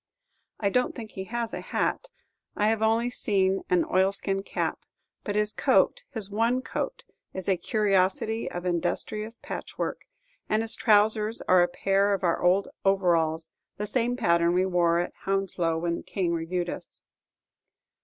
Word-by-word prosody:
I 200 -2 +1
don't 250 +3 +1
think 225 -4 -8
he 190 - -6
has 235 +1 -3
a - - -4
hat - - -1 0.5
I 210 +1 +2
have 220 -1 0
only 225 +2 +2
seen 195 -5 +1
an 180 -1 +3
oilskin 195 +1 +1
cap; - - -2 0.4
but 205 - -3
his 210 0 +1
coat, - - +2
his 220 -7 -2
one 230 +5 +1
coat, - - -4 0.3
is 190 -1 -4
a 195 - +3
curiosity 200 +3 +1
of 175 +1 -6
industrious 215 +5 -2
patchwork; - - -5 0.4
and 215 +1 +2
his 225 - -1
trousers 215 0 +3
are 185 -1 +5
a 175 - +4
pair 195 +3 +1
of 195 - -7
our 170 -2 +1
old 185 +3 +3 0.2
overalls, 165 -4 +2 0.2
the 210 - -2
same 245 +2 0
pattern 170 -6 +3
we 185 +1 +2
wore 175 -2 +2
at 175 - -2
Hounslow 190 -4 0
when 170 +1 -1
the - - -7
King 180 -3 -2
reviewed 175 +1 -2
us. - - -8
195 Hz, 160 wpm, -27 LUFS, 175-220 Hz, 0.5 s, are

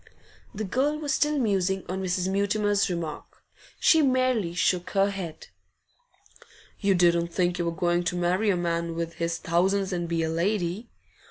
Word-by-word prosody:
The 215 - -3
girl 270 +9 0
was 300 -1 -2
still 300 0 +1
musing 195 -6 0
on 190 +1 -3
Mrs. 185 0 -1
Mutimer's 200 +1 +1
remark; 170 -4 -6 0.4
she 320 - +5
merely 255 - +1
shook 180 0 +1
her 200 0 +2
head. 180 -5 -7 1.3
'You 200 -2 +2
didn't 170 -1 +3
think 175 +1 -1
you 175 - 0
were 170 - 0
going 175 +1 0
to 180 - -1
marry 180 +4 +1
a 190 - +2
man 170 -1 -2
with 165 0 -3
his 170 0 0
thousands 190 +4 0
and 175 -1 -3
be 165 -1 0
a 160 - -1
lady? 185 +4 -1
185 Hz, 165 wpm, -26 LUFS, 170-205 Hz, 1.3 s, she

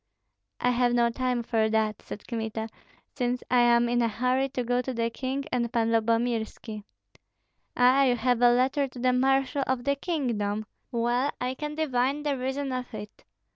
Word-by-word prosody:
"I 250 - +2
have 245 0 +2
no 235 -1 +3
time 250 -1 -1
for 220 -2 +1
that," 215 -1 0
said 210 - -9
Kmita, 220 -1 -4 0.4
"since 245 -2 -1
I 250 - +5
am 240 0 +4
in 240 0 +1
a 235 - +3
hurry 255 +4 0
to 255 -2 -3
go 245 +1 +1
to 255 0 -5
the 230 0 0
king 265 +3 -3
and 235 -2 0
Pan 230 -2 +1
Lyubomirski." 225 -1 -1 0.9
"Ah, 255 +3 +5
you 250 -2 +3
have 245 0 +1
a 245 - +7
letter 265 +3 +2
to 255 - -14
the 250 +1 +2
marshal 270 +2 +2
of 255 -2 -1
the 280 +2 +1
kingdom? 230 - -2 0.3
Well, 240 +3 +1
I 250 +1 -1
can 300 +2 -5
divine 280 -1 0
the 290 -2 0
reason 265 +2 -3
of 255 -1 -4
it. 210 0 -10
245 Hz, 180 wpm, -27 LUFS, 230-260 Hz, 0.9 s, a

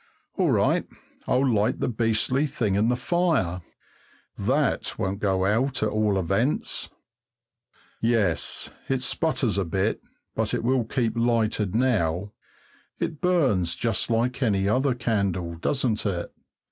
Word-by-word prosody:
All - - +2
right, - - +2 0.4
I'll 135 +2 +2
light 110 -4 +1
the - - 0
beastly 115 +4 +1
thing 110 -7 -1
in 105 +4 +2
the 125 - +2
fire. 130 - 0 0.7
That - - 0
won't 95 +1 -2
go 95 -2 +1
out, 125 +7 +1
at 110 - +2
all 105 -2 +1
events. 95 - -1 1.1
Yes, 110 -8 0 0.2
it 135 -1 0
sputters 130 -9 0
a - - +1
bit, 95 +5 -1 0.3
but - - -1
it - - -3
will 125 -1 +2
keep 115 -1 -1
lighted 115 -4 +1
now. 100 -6 +1 0.7
It 155 - -4
burns 130 - +2
just 115 -2 -1
like 120 +3 0
any 100 -6 +2
other 130 +4 +2
candle, 100 -8 -1
doesn't 110 - 0
it? 90 -3 -3
110 Hz, 135 wpm, -25 LUFS, 100-125 Hz, 1.1 s, All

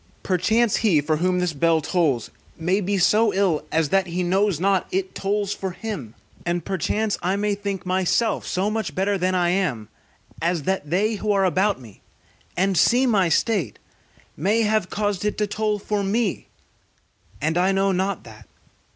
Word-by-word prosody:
Perchance, 210 +5 +2
he 200 -9 +3
for 155 +2 0
whom 180 +2 +1
this 180 -2 0
bell 165 +2 +2
tolls 150 - 0 0.3
may 180 +5 0
be 200 +1 0
so 215 +4 +4
ill, 190 -6 +1
as 160 -2 +1
that 195 +1 +2
he 175 +1 -2
knows 190 -1 +1
not 190 0 +1
it 190 0 -2
tolls 200 0 -1
for 190 -2 -5
him; 175 - -6 0.3
and 175 0 -2
perchance 200 +3 -1
I 185 +2 0
may 205 +1 0
think 200 -2 -4
myself 190 +5 0
so 195 +3 0
much 215 -9 -3
better 195 +2 +1
than 185 +1 +1
I 175 -1 +2
am, 145 - -1 0.5
as 170 -1 0
that 190 -3 -2
they 205 +7 +1
who 210 +1 -1
are 195 -1 +2
about 190 +1 +1
me, 115 -6 -15 0.6
and 190 +1 +2
see 245 +10 +4
my 200 -8 +3
state, 180 - 0 0.6
may 210 +8 +1
have 215 -4 +1
caused 205 -2 -2
it 210 - -1
to 210 - +1
toll 210 0 -1
for 205 0 -2
me, 205 0 -1 0.9
and 160 +3 0
I 180 +2 +3
know 195 0 +2
not 190 0 -1
that. 110 -2 -14
190 Hz, 175 wpm, -23 LUFS, 175-205 Hz, 0.9 s, so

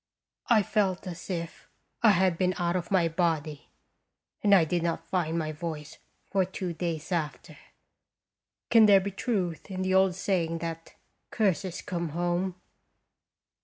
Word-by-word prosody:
I 220 -4 +5
felt 195 -2 0
as 180 0 -8
if 170 -3 -5 0.3
I 230 - +6
had 185 -2 +3
been 185 +1 0
out 175 0 0
of 175 -2 -2
my 185 -4 +3
body. 160 -3 -1 0.7
And 200 -1 +6
I 175 -4 +5
did 175 +2 -1
not 170 0 -2
find 170 -3 -1
my 155 -2 -2
voice 155 -1 -6 0.3
for 195 -1 +3
two 185 -1 -4
days 165 0 -4
after. 160 -4 -3 1.2
Can 225 -2 +7
there 200 -1 +7
be 200 +1 -4
truth 190 -5 -2
in 185 -1 -3
the 185 0 0
old 190 -1 +4
saying 175 -3 0
that 165 0 -6 0.3
curses 190 -4 -1
come 170 -2 -3
home? 175 +3 -1
175 Hz, 150 wpm, -28 LUFS, 165-190 Hz, 1.2 s, Can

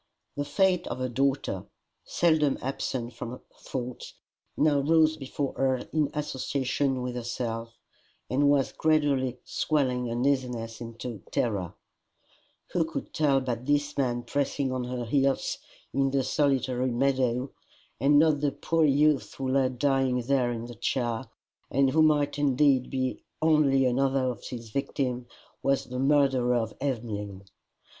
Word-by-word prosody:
The 145 - -2
fate 180 +4 +2
of - - -4
her 130 0 -1
daughter, 135 -6 -1 0.4
seldom 155 -4 +2
absent 125 -2 -3
from 115 0 -6
her 125 - -8 0.2
thoughts, 125 -1 -6 0.4
now 150 -1 +3
rose 160 +2 +4
before 140 -1 -4
her 130 -1 +2 0.2
in 155 -2 +2
association 135 -2 -1
with 125 0 -3
herself, 115 -1 -4 0.5
and 140 +3 +2
was 140 -2 +2
gradually 145 -5 +1
swelling 125 -5 0
uneasiness 120 -2 -1
into 115 -1 -7
terror: 100 -7 -1 1.0
who 175 - +2
could 160 +1 -6
tell 140 -4 +3
but 125 -1 -4
this 145 0 +1
man 120 -3 0
pressing 140 -1 -1
on 130 -1 -2
her 125 -1 -4
heels 135 +2 +1 0.3
in 135 0 +2
the 135 0 +1
solitary 130 -2 +1
meadow, 130 0 +1 0.5
and 140 +4 +4
not 155 -1 +4
the 145 -1 +1
poor 165 -1 +1
youth 145 0 +2
who 135 -1 -3
lay 130 -1 +3
dying 130 0 +1
there 125 -1 +1
in 115 -1 -4
the 120 - -8
chair, 120 0 -1 0.4
and 135 0 +3
who 160 - +3
might 145 -2 +3
indeed 140 -2 +3
be 130 -1 -2 0.2
only 150 -4 +4
another 130 +1 +2
of 120 - -9
his 115 -3 -7
victims, 130 -2 -2 0.3
was 135 0 +1
the 125 0 -5
murderer 135 -3 +3
of 115 -2 -1
Emmeline! 105 -7 -3
135 Hz, 140 wpm, -27 LUFS, 125-145 Hz, 1.0 s, rose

